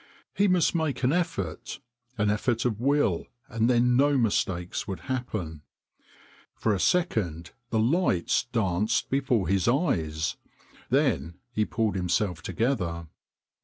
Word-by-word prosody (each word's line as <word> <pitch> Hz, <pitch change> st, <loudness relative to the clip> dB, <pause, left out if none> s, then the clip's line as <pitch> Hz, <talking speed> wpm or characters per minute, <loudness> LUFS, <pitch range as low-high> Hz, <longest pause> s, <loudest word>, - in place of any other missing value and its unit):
He 205 Hz, -, +3 dB
must 180 Hz, -3 st, +3 dB
make 160 Hz, -6 st, -1 dB
an 130 Hz, +3 st, +3 dB
effort, 175 Hz, -3 st, -2 dB, 0.4 s
an 105 Hz, 0 st, +2 dB
effort 115 Hz, +3 st, 0 dB
of 110 Hz, -4 st, 0 dB
will, 135 Hz, -, +1 dB, 0.2 s
and 115 Hz, -2 st, 0 dB
then 125 Hz, 0 st, +3 dB
no 140 Hz, +2 st, +4 dB
mistakes 95 Hz, -6 st, -1 dB
would 95 Hz, -3 st, -5 dB
happen. 105 Hz, -, -4 dB, 0.9 s
For 110 Hz, -, 0 dB
a 100 Hz, -, -1 dB
second 90 Hz, -, 0 dB, 0.2 s
the 115 Hz, -, 0 dB
lights 115 Hz, -, +2 dB
danced 110 Hz, -2 st, 0 dB
before 130 Hz, -, +1 dB
his 95 Hz, +2 st, +1 dB
eyes, 80 Hz, -, 0 dB, 0.5 s
then 80 Hz, +5 st, +1 dB, 0.2 s
he 110 Hz, -2 st, 0 dB
pulled 110 Hz, -1 st, 0 dB
himself 90 Hz, -1 st, -1 dB
to 95 Hz, -, -6 dB
gether. 85 Hz, -, -1 dB
110 Hz, 130 wpm, -27 LUFS, 90-130 Hz, 0.9 s, no